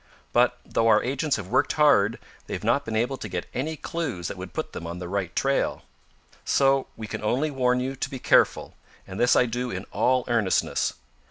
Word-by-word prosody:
But, - - +3
though 115 - +1
our 110 -1 +5
agents 140 +3 0
have 100 - -5
worked - - +2
hard, 115 -8 +4 0.3
they - - -3
have - - -6
not 120 +6 +2
been 110 - -3
able 120 +4 0
to 105 - -7
get 90 -1 -3
any 155 +5 -3
clues 140 - -4
that - - -6
would 90 -1 -7
put - - -5
them 85 - -6
on 85 +1 -5
the 90 -1 -6
right 95 -2 -3
trail. 135 0 0 0.6
"So 135 -1 +2
we 110 - -6
can 110 - -6
only 135 +8 0
warn 125 -2 +1
you 130 +2 -3
to 135 - -3
be 135 - -6
careful, - - +2 0.3
and 95 +1 -8
this 120 - +4
I - - +5
do 125 +1 -3
in 95 -1 -5
all 125 +4 +2
earnestness. 115 -6 +1
120 Hz, 210 wpm, -25 LUFS, 100-135 Hz, 0.6 s, our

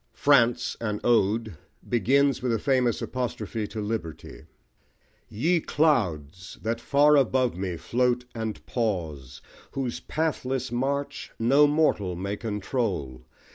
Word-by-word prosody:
France, 120 -4 +3
an 105 -2 -2
Ode, 110 -4 +1 0.3
begins 135 +3 +2
with 125 -1 0
a 115 - +2
famous 125 -1 +1
apostrophe 115 -4 -3
to 110 - -7
Liberty 105 -7 -5 0.8
Ye 165 +11 +1
Clouds! 95 - 0
that 115 +1 -2
far 145 +4 +4
above 130 -5 +2
me 90 -2 -3
float 125 +4 0
and 110 -2 -5
pause, 80 - -3 0.3
Whose 130 -3 -3
pathless 135 -5 -2
march 140 +3 -2
no 135 +6 +5
mortal 145 - +1
may 100 +3 -3
control! 100 - -3
115 Hz, 115 wpm, -26 LUFS, 105-135 Hz, 0.8 s, no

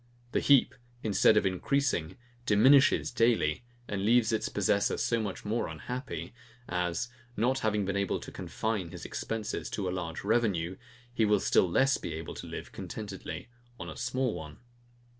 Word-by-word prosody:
The - - +2
heap, 140 -2 +5 0.3
instead 110 0 +4
of 105 - +3
increasing, 95 - 0 0.3
diminishes 135 +8 +5
daily, 115 -8 +2 0.2
and 100 -1 -2
leaves 115 +1 +4
its 110 - 0
possessor 100 0 +1
so 115 -1 +1
much 105 -1 -5
more 110 +3 0
unhappy, 125 - -6 0.3
as, 90 +5 -1 0.3
not 125 +5 +2
having 105 -3 0
been 95 0 -2
able 100 -1 0
to - - -9
confine 110 -6 -3
his - - -9
expences 115 0 -4
to 100 -3 -3
a - - -1
large 85 -3 -4
revenue, 100 -5 +1 0.4
he 115 - +1
will 105 -1 +4
still 95 - +3
less 135 +9 +3
be 80 - -5
able 80 0 -6
to - - -8
live - - -7
contentedly 100 +2 -7 0.3
on - - -6
a - - -9
small 125 0 -1
one. 75 -3 -8
105 Hz, 160 wpm, -30 LUFS, 90-120 Hz, 0.4 s, heap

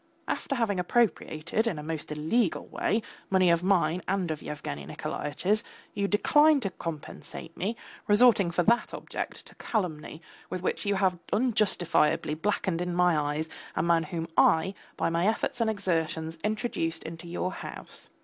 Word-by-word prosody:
After 275 - -2
having 220 -6 +1
appropriated, 215 -1 +1
in 180 - -1
a 150 - -5
most 155 -1 -4
illegal 160 +7 +1
way, 220 +1 0 0.3
money 185 -2 +4
of 170 0 +3
mine 180 -2 +2
and 190 -3 0
of 155 - -4
Yevgeny 70 - -5
Nikolaitch's, 180 - -2 0.3
you 200 0 0
decline 295 +9 +5
to 195 - -2
compensate 165 0 -7
me, 205 +6 -2 0.3
resorting 210 -3 +5
for 175 +1 +1
that 235 +6 +2
object - - -6
to - - -13
calumny 160 -8 -2 0.3
with 185 -1 -4
which 195 - -1
you 200 - +2
have 190 -2 +1
unjustifiably 200 -10 +2
blackened 175 +1 -1
in 180 -1 -2
my 180 -1 +4
eyes 150 +1 -1 0.3
a - - +1
man 170 -1 +4
whom 165 +1 -4
I, 175 +4 +4 0.2
by - - +1
my 170 +3 +2
efforts 235 +3 0
and 225 - +3
exertions, 165 -5 -1
introduced 210 -7 -1
into 165 +1 -8
your 175 +2 -2
house. - - -9
180 Hz, 160 wpm, -28 LUFS, 160-210 Hz, 0.3 s, decline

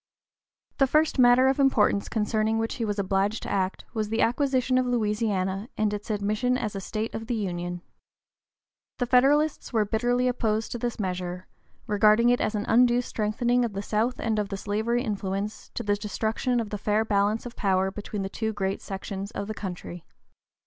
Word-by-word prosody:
The 270 - +5
first 305 +1 +2
matter 245 +1 +6
of 270 +1 +2
importance 235 -7 +3
concerning 220 0 0
which 225 0 -1
he 230 - -1
was 205 -1 -2
obliged 200 +2 0
to - - -5
act 190 -1 -1
was 215 -2 -2
the 225 +1 0
acquisition 255 0 +2
of 255 - 0
Louisiana 210 -3 -1
and 210 -1 +1
its 210 +2 -6
admission 215 +4 0
as 215 -4 -3
a 195 - -3
state 215 +3 -4
of 225 0 -5
the 240 - -1
Union. 175 -4 -3 1.1
The 245 - 0
Federalists 275 +5 +3
were 220 -3 +2
bitterly 245 +4 +1
opposed 225 -3 0
to 240 - -4
this 240 -1 -3
measure, 180 -2 -3 0.4
regarding 215 +3 +4
it 245 - +3
as 215 - 0
an 205 - -2
undue 245 +1 +4
strengthening 240 +3 0
of 230 -3 -2
the 200 +1 -4
South 225 +5 0
and 220 -2 0
of 205 -1 -2
the 195 - -4
slavery 220 +5 -1
influence, 200 -2 -3
to 235 - -3
the 205 -1 +1
destruction 220 +4 -1
of 220 -3 -4
the 210 - -3
fair 210 +2 +1
balance 210 +2 +1
of 245 - -8
power 190 -1 +1
between 205 0 -5
the - - -2
two 220 +2 -3
great 195 -1 -2
sections 195 0 -5
of 200 - -5
the 215 - -3
country. 180 -4 -7
215 Hz, 190 wpm, -26 LUFS, 200-240 Hz, 1.1 s, matter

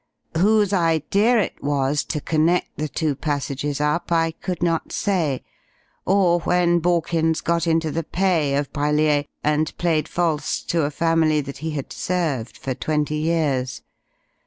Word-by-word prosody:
"Whose 205 +3 +3
idea 180 - +2
it 200 - -3
was 140 0 +1
to 150 - -2
connect 160 +4 +1
the 155 - -2
two 155 0 -1
passages 145 0 -3
up 150 +4 -1
I 165 -1 +2
could 175 +2 -5
not 165 -2 0
say, 165 -10 0 0.6
or 185 -3 +3
when 175 0 +2
Borkins 165 -1 +1
got 170 0 0
into 160 -1 +1
the 165 - -1
pay 165 -5 +1
of 145 0 -2
Brellier 150 0 +2 0.2
and 150 +1 0
played 165 -3 +1
false 165 -4 -1
to 165 -3 0
a - - 0
family 160 0 +2
that 140 -1 -8
he 160 +2 -3
had 140 - -5
served 155 -10 -2
for 130 - -3
twenty 150 +3 -1
years. 145 - -1
160 Hz, 150 wpm, -22 LUFS, 145-170 Hz, 0.6 s, Whose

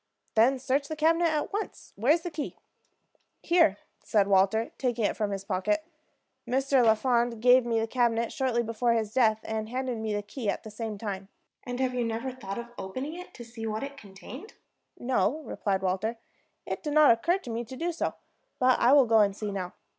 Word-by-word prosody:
"Then 245 +5 +4
search 270 +2 0
the 315 - -4
cabinet 330 +2 +3
at 310 +3 -1
once. 420 +1 -5
Where 235 +8 +2
is 335 +2 +3
the 350 - -4
key?" 300 -2 -5 0.9
"Here," 335 - +4 0.3
said 205 -2 +2
Walter, 200 +3 +3
taking 240 -4 0
it - - 0
from 210 -2 -1
his 195 -1 -4
pocket. 310 +12 -1 0.6
"Mr. 265 +1 +2
Lafond 235 +1 +2
gave 250 +1 +5
me 230 -1 +1
the 225 - 0
cabinet 235 -1 0
shortly 255 -5 0
before 230 +1 +1
his 220 -2 -1
death, 220 -4 +3
and 220 0 -3
handed 255 -1 -3
me 220 -1 -2
the 205 - -2
key 210 +2 -4
at - - -2
the 220 - -9
same 215 -1 -5
time." 195 -2 -5 0.4
"And 245 0 -4
have 260 -1 0
you 250 -1 0
never 230 +3 -2
thought 200 -6 -7
of 235 0 -6
opening 260 +11 -5
it 360 +2 -9
to 240 - -9
see 225 -1 -7
what 215 +2 -3
it 280 0 -6
contained?" 245 - -11 0.4
"No," 250 +4 0
replied 195 -7 -2
Walter. 195 +5 -1 0.5
"It - - -4
did 300 -3 -3
not 305 -3 +7
occur 335 +11 +2
to 255 -11 -8
me 230 +1 -2
to 260 - -9
do 345 +4 -1
so. 335 - -2 0.4
But 255 0 +3
I 245 +3 +5
will 280 -3 +7
go 225 -1 +4
and 200 -1 +3
see 210 -1 -3
now." 185 -2 -4
235 Hz, 205 wpm, -28 LUFS, 215-265 Hz, 0.9 s, not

